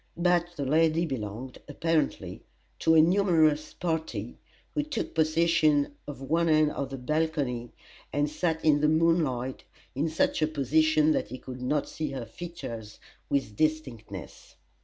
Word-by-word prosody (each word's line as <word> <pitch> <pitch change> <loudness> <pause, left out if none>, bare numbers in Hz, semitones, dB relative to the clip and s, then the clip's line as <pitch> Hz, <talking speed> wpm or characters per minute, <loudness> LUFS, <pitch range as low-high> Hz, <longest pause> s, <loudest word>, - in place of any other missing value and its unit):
But 175 0 +1
the 140 - -3
lady 160 +4 +3
belonged, 125 -2 -5
apparently, 165 -2 -1 0.4
to 160 - +4
a 160 - +8
numerous 160 -5 +3
party, 160 -2 -3 0.3
who 295 - +1
took 290 -6 -4
possession 155 -2 +2
of 140 -2 -7
one 165 +4 +1
end 155 -1 +4
of 140 -1 -4
the 135 - -5
balcony 135 -3 -1 0.4
and 145 +1 +1
sat 160 +1 -2
in 145 -2 +4
the 150 - +4
moonlight, 155 -6 +1 0.3
in 145 +5 -1
such 160 - +1
a 155 - +3
position 155 +1 +3
that - - 0
he 125 +4 -7
could 125 0 -9
not 140 +3 0
see 155 -2 -4
her 130 -3 -4
features 115 -6 -8 0.3
with 135 -7 -1
distinctness. 125 - -3
155 Hz, 145 wpm, -28 LUFS, 135-165 Hz, 0.4 s, a